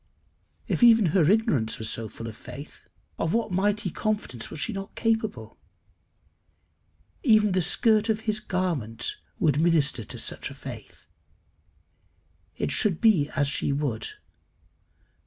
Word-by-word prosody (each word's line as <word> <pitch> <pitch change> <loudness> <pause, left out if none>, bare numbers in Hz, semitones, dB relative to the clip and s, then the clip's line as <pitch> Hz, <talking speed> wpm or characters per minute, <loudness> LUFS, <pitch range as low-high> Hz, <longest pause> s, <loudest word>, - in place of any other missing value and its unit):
If - - -1
even 230 -3 +7
her 170 -5 +4
ignorance 200 - +1
was 110 - -4
so 110 0 -3
full 115 - -9
of 110 -2 -7
faith, - - -11 0.3
of 165 - 0
what 230 -3 0
mighty 200 0 0
confidence 205 - -3
was 155 - -8
she 225 - 0
not 195 0 -7
capable! 225 -1 -2 1.6
Even 215 - +4
the 185 0 +2
skirt 220 +4 +2
of 220 0 +1
his 215 -1 -1
garment 175 - -2 0.2
would 155 - +2
minister 155 -8 +2
to - - -7
such - - -3
a - - -10
faith. - - -10 1.5
It 75 - -1
should 190 -6 +2
be 185 -11 +4
as 145 -1 +2
she 140 - +1
would. 140 -6 -2
185 Hz, 140 wpm, -26 LUFS, 140-215 Hz, 1.6 s, even